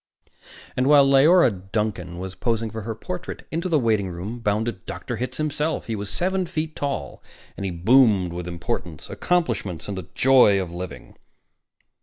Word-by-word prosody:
And, 130 +1 +1
while 145 -1 +7
Leora 140 +2 +6 0.2
Duncan 100 -5 -2
was 95 +1 -6
posing 115 +1 -1
for 110 - -5
her 110 +2 -4
portrait, 180 +9 -6
into 170 +3 -2
the 160 - +3
waitingroom 105 -2 -1
bounded 105 -2 -1
Dr. - - -5
Hitz 125 +1 -4
himself. 155 +1 -1
He 115 - -3
was 100 -1 -5
seven 185 - -1
feet 155 -1 -3
tall, 140 - -4 0.3
and 100 - -5
he - - -3
boomed 95 -1 +4
with 90 0 -5
importance, 85 -1 -5
accomplishments, 115 - -1
and 100 - -4
the 95 -4 -6
joy 125 -7 +6
of 90 -3 -4
living. 90 +1 -8
115 Hz, 160 wpm, -23 LUFS, 95-140 Hz, 0.3 s, while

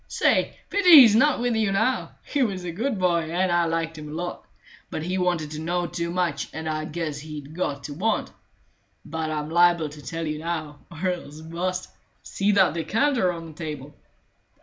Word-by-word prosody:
Say, - - +1
pity 360 -7 +9
he's 225 -4 +7
not 285 +4 +4
with 240 -1 0
you 215 -2 +1
now; 225 +6 0
he 285 - -1
was 195 -7 0
a 175 - -4
good 220 +7 -2
boy, 170 -3 +1
and 180 +2 +1
I 175 0 +3
liked 165 -1 -2
him 150 0 -8
a - - -8
lot; 175 +3 -5 0.4
but 155 - -4
he 185 +3 -1
wanted 175 -4 0
to 155 - -5
know 175 +2 -1
too 170 0 -3
much, 170 -5 -1
and 160 0 -5
I 155 0 -2
guess 155 -2 -4
he'd 150 -1 -8
got 145 -5 -3
to 145 - -6
want. 210 +8 -1 0.7
But 160 -1 -3
I'm 155 0 -3
liable 170 -2 +4
to 150 0 -11
tell 165 +5 -4
you 155 -1 -3
now, 155 -3 -4
or 175 +2 -3
else 155 -4 -7
bu'st. 180 +3 -3 0.3
See 200 +1 0
that 190 -6 +4
decanter 225 - +1
on 165 -1 -7
the 160 - -10
table?" 150 -3 -7
170 Hz, 195 wpm, -25 LUFS, 155-185 Hz, 0.7 s, pity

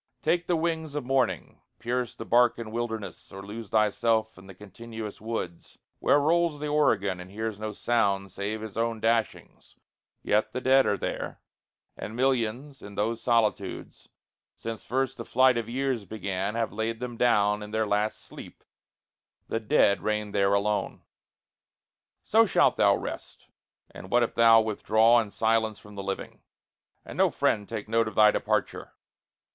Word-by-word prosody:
Take 175 0 +1
the 175 - +2
wings 160 -2 -2
Of 145 -4 -3
morning, 135 0 -1 0.2
pierce 125 0 -3
the - - -8
Barcan 120 -2 +2
wilderness, 110 -2 -5
Or 95 0 -9
lose 105 +1 -8
thyself 110 +1 +1
in 90 +2 -15
the 95 - -12
continuous 110 +2 -9
woods 110 -6 -6 0.2
Where - - +4
rolls 165 0 +1
the 150 0 -3
Oregon, 100 -11 +1
and 90 +1 -9
hears 110 +1 -4
no 110 0 -4
sound 100 -5 0
Save 105 +2 -4
his 110 -2 -8
own 115 0 -1
dashings 115 0 -2 0.5
yet 105 +1 +1
the - - -2
dead 130 +1 +4
are 100 - +1
there; - - -4 0.6
And 110 - -7
millions 130 +2 -1
in 100 0 -10
those 115 +3 -1
solitudes, 110 -5 -1 0.5
since 115 -1 -6
first 135 +1 -1
The 115 - -5
flight 130 +2 +4
of 115 -1 -3
years 130 -2 -1
began, 100 0 -3
have 115 -1 -1
laid 110 +1 -3
them 125 -1 -5
down 105 -3 +2
In 105 - -7
their 110 +1 0
last 105 +1 -1
sleep - - -12 0.9
the 115 - -1
dead 105 -2 +3
reign 105 -1 -2
there 100 0 +2
alone. 105 +1 -1 1.2
So 225 +1 +4
shalt - - +3
thou - - +4
rest; - - -8 0.4
and 95 - -11
what 120 +2 +3
if 115 - -2
thou 115 -1 +6
withdraw 110 +2 +3
In 110 - -6
silence 110 0 0
from 105 - -15
the 100 - -6
living, 95 0 -6 0.6
and - - -9
no - - +5
friend 105 -1 0
Take 110 -3 -5
note 115 0 +1
of 110 - -6
thy 105 -1 +6
departure? - - -2
110 Hz, 160 wpm, -27 LUFS, 105-120 Hz, 1.2 s, thou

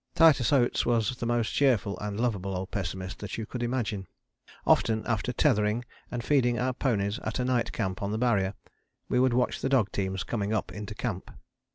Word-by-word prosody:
Titus 155 -7 +5
Oates 125 -4 +3
was 120 0 +1
the 120 - -3
most 120 -2 0
cheerful 115 -8 +2
and 105 0 -4
lovable 100 -6 -1
old 95 +1 -5
pessimist 95 -1 -4
that 105 - -5
you 110 - -3
could 125 +2 -6
imagine. 115 -5 -2 0.6
Often, 110 -1 +3
after 115 +1 0
tethering 115 -3 +2 0.2
and 120 -1 -4
feeding 125 -4 +2
our 125 +1 0
ponies 110 -4 0
at - - -3
a 125 - 0
night 125 -2 +1
camp 95 -1 -3
on 100 - -1
the 110 - -1
Barrier, 105 -5 +1 0.5
we 125 - +2
would 130 -1 +3
watch 125 0 +1
the 135 - 0
dog 125 -7 +3
teams 95 -1 -2
coming 105 -2 -2
up 110 - -1
into 105 0 -6
camp. 105 -5 -4
115 Hz, 195 wpm, -28 LUFS, 100-125 Hz, 0.6 s, Titus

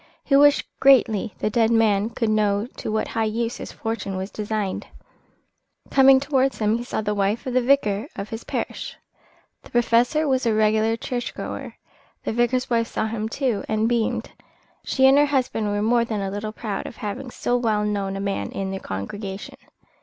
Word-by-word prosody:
He 275 - +2
wished 290 +1 +5
greatly 230 -6 +4
the 210 - -1
dead 225 0 +3
man 220 -2 +3
could 230 -2 -1
know 210 -1 +2
to - - -4
what 215 - -1
high 225 -1 0
use 230 +2 -2
his - - -7
fortune 225 -4 -4
was 190 +2 -5
designed. 210 -2 -3 1.0
Coming 270 -1 +7
towards 270 -1 +1
him 215 +1 +1
he - - -4
saw 240 - -3
the 210 0 -1
wife 205 +2 0
of 255 - -3
the 255 - +3
vicar 240 -4 +2
of 200 - -6
his 225 +1 -6
parish. - - -4 0.6
The - - -16
Professor 240 +6 +2
was 260 -2 +1
a 220 - +2
regular 220 +1 +2
church 245 +1 -4
goer. - - -6 0.5
The - - -2
vicar's 240 +2 +1
wife 230 -1 +1
saw 220 - -2
him, 220 0 -3
too, 245 -4 -1
and 220 +1 +1
beamed. 235 -2 -1 0.5
She 265 - +2
and 270 +2 +7
her 290 - +4
husband 255 -6 0
were 205 0 -1
more 235 +1 +3
than 220 -3 -3
a 195 -1 -3
little 205 +2 -4
proud 215 -2 -4
of - - -9
having 245 +3 -5
so 245 0 -1
well 220 -4 +1
known 200 -2 -2
a - - -4
man 200 0 -2
in 195 -1 -3
their 195 - -4
congregation. 190 - -6
225 Hz, 190 wpm, -23 LUFS, 210-245 Hz, 1.0 s, Coming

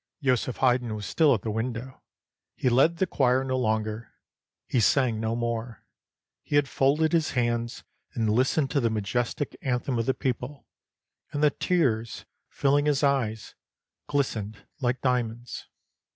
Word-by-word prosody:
Joseph 125 -2 +1
Haydn 125 -3 +2
was 105 -1 -6
still 155 +5 +3
at 100 - -6
the 110 - -2
window; 115 +3 -4 0.5
he 130 - +1
led 140 +8 +4
the 190 - +2
choir 130 -6 +2
no 130 -1 -1
longer; 110 -2 -2 0.5
he 125 - 0
sang 120 0 +3
no 110 +1 -1
more. 115 -1 -3 0.6
He - - -3
had 145 -1 +4
folded 150 +5 +2
his 160 -2 +1
hands 120 -1 -1 0.3
and 115 -2 0
listened 130 +6 +2
to 140 - +2
the 115 -3 +1
majestic 115 +6 -2
anthem 125 -1 -1
of 115 - -1
the 130 - +2
people, 130 +1 -3 0.7
and 145 0 -2
the 150 - +5
tears, 115 -13 0 0.2
filling 145 +1 +2
his 145 -1 +1
eyes, 115 -6 0 0.5
glistened 110 -7 -2
like 125 -1 -1
diamonds. 120 -2 -2
125 Hz, 150 wpm, -27 LUFS, 115-140 Hz, 0.7 s, the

